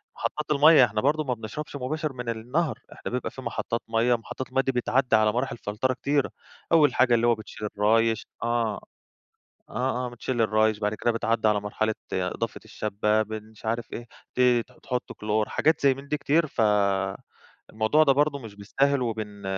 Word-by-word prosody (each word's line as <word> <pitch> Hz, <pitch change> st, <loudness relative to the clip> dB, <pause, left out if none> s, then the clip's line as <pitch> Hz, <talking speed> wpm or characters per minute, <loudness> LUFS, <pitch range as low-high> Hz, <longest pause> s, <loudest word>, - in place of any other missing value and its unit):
محطات 150 Hz, 0 st, -3 dB
المَيَّة، 150 Hz, -1 st, +7 dB
إحنا 105 Hz, -1 st, -2 dB
برضه 150 Hz, +4 st, +2 dB
ما 130 Hz, -4 st, -1 dB
بنشربش 120 Hz, +7 st, -7 dB
مباشر 150 Hz, +3 st, -3 dB
من 125 Hz, -2 st, -5 dB
النهر، 125 Hz, +8 st, -1 dB
إحنا -, -, -7 dB
بيبقى 125 Hz, +1 st, -2 dB
في 130 Hz, -, -9 dB
محطات 115 Hz, -1 st, -3 dB
مَيَّة. 115 Hz, +2 st, +3 dB
محطات 120 Hz, +3 st, -7 dB
المَيَّة 135 Hz, +1 st, +1 dB
دي 135 Hz, -, 0 dB
بتتعدى 125 Hz, -1 st, +2 dB
على 110 Hz, -1 st, +4 dB
مراحل 125 Hz, +1 st, -2 dB
فلترة 115 Hz, +5 st, -1 dB
كتيرة، 140 Hz, +2 st, 0 dB, 0.4 s
أول 150 Hz, -5 st, +5 dB
حاجة 125 Hz, -2 st, +4 dB
اللي 120 Hz, 0 st, +3 dB
هو 120 Hz, -, +4 dB
بتشيل 105 Hz, -1 st, -7 dB
الرايش 115 Hz, +2 st, +2 dB, 0.2 s
آه، 115 Hz, -3 st, 0 dB, 0.9 s
آه، 125 Hz, +2 st, -1 dB
آه، -, -, -4 dB
بتشيل 120 Hz, 0 st, -3 dB
الرايش، 110 Hz, -1 st, +2 dB
بعد 105 Hz, 0 st, -1 dB
كده 120 Hz, -, 0 dB
بتعدي 115 Hz, -1 st, +1 dB
على 105 Hz, -1 st, +2 dB
مرحلة 110 Hz, +1 st, -1 dB, 0.2 s
إضافة 95 Hz, +5 st, -2 dB
الشبة، 105 Hz, +1 st, 0 dB
بن 110 Hz, 0 st, -7 dB
مش 110 Hz, +1 st, -19 dB
عارف 115 Hz, +1 st, -2 dB
إيه، 120 Hz, -, -6 dB, 0.3 s
ت -, -, -2 dB, 0.4 s
تحط 125 Hz, -2 st, -3 dB
كلور، 105 Hz, 0 st, -1 dB
حاجات 160 Hz, +1 st, +2 dB
زي 140 Hz, -2 st, +4 dB
من 135 Hz, +2 st, -11 dB
دي 150 Hz, -, 0 dB
كتير. 155 Hz, +2 st, +2 dB
فالموضوع 105 Hz, -6 st, 0 dB, 0.7 s
ده 140 Hz, -, +5 dB
برضه 145 Hz, +1 st, +1 dB
مش 115 Hz, -6 st, -10 dB
بالساهل، 135 Hz, +7 st, 0 dB
وبن 110 Hz, -3 st, -4 dB
120 Hz, 180 wpm, -26 LUFS, 110-135 Hz, 0.9 s, المَيَّة